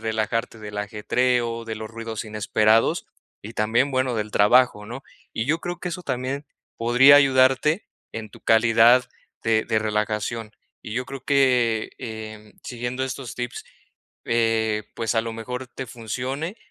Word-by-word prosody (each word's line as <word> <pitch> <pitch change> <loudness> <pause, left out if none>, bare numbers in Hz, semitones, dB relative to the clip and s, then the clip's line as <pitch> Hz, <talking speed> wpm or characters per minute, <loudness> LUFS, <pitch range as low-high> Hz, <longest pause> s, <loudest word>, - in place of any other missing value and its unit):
relajarte 110 +1 -2
del 105 -1 -8
ajetreo, 115 +3 0
de 110 -1 -4
los 110 0 -7
ruidos 115 -1 -6
inesperados 110 +1 +2 0.3
y 110 +3 -10
también, 115 +6 +1
bueno, 130 -1 0
del 105 -1 -3
trabajo, 105 0 +4
¿no?, 125 +4 -7 0.3
y 110 - -2
yo 155 +3 +1
creo 175 0 -5
que - - -3
eso 180 +1 -5
también 130 0 -3 0.3
podría 125 +5 +6
ayudarte 135 - +3 0.3
en 110 -1 -6
tu - - -15
calidad 115 +2 +5 0.3
de 110 -1 +2
de 110 - +1
relajación, 105 +1 -2 0.3
y 105 - -7
yo 125 +3 -2
creo 135 -1 -8
que, 125 -6 +2
eh, 110 -1 -8
siguiendo 120 +1 -4
estos 130 -2 -6
tips, 120 -1 -5 0.6
eh, 110 -2 +1
pues, 115 0 -2
a - - +4
lo 115 - -5
mejor 125 +3 -6
te 130 +2 -7
funcione 130 - -4
115 Hz, 150 wpm, -23 LUFS, 110-130 Hz, 0.6 s, podría